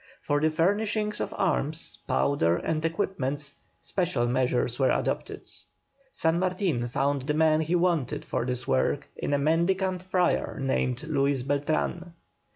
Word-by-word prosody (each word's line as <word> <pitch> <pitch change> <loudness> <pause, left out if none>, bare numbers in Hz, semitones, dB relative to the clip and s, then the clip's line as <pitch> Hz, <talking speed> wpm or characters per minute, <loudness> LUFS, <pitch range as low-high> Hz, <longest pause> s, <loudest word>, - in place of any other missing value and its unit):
For 145 0 0
the 155 - +4
furnishing 210 +6 +1
of - - -2
arms, 160 -3 0
powder 85 -13 +2
and 155 - -2
equipments, 150 -5 -1 0.3
special 175 -10 0
measures 125 0 0
were 130 - +4
adopted. - - -1 0.7
San 160 +1 +1
Martin 180 - 0
found 140 +2 -1
the 150 - +1
man 155 0 +4
he 160 +3 0
wanted 170 -7 0
for - - -1
this 125 0 -3
work 65 0 +1
in - - -3
a 145 - +3
mendicant 180 +5 +1
friar 185 -4 0
named 130 -1 -1
Luis 140 -4 0
Beltran. 155 +5 -1
155 Hz, 140 wpm, -27 LUFS, 135-175 Hz, 0.7 s, the